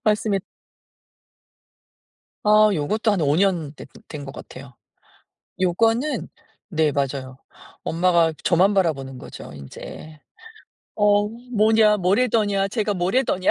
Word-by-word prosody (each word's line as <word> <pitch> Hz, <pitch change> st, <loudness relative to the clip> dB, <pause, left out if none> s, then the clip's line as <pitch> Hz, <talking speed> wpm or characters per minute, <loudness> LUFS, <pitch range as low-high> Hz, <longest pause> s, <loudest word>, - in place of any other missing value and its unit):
맞습니 210 Hz, -2 st, +1 dB, 2.0 s
아 215 Hz, 0 st, +6 dB
요것도 215 Hz, +9 st, 0 dB
한 195 Hz, -, 0 dB
5 145 Hz, 0 st, +2 dB
년 175 Hz, -7 st, +1 dB
됐 -, -, -11 dB, 0.2 s
된 145 Hz, -2 st, -7 dB
것 135 Hz, -, -8 dB
같아요. 130 Hz, -1 st, -11 dB, 0.9 s
요거는 225 Hz, -, +1 dB, 0.4 s
네 160 Hz, -5 st, +1 dB
맞아요 135 Hz, -2 st, -3 dB, 0.5 s
엄마가 170 Hz, -1 st, +2 dB
저만 185 Hz, +4 st, +3 dB
바라보는 135 Hz, -9 st, -1 dB
거죠. -, -, -10 dB
인제. 145 Hz, -, -11 dB, 0.7 s
"어 205 Hz, 0 st, +3 dB
뭐냐 220 Hz, -2 st, +2 dB
뭐래더냐 200 Hz, 0 st, +1 dB
쟤가 210 Hz, -1 st, -1 dB
뭐래더냐" 185 Hz, +1 st, +1 dB
190 Hz, 215 characters per minute, -22 LUFS, 155-215 Hz, 2.0 s, 아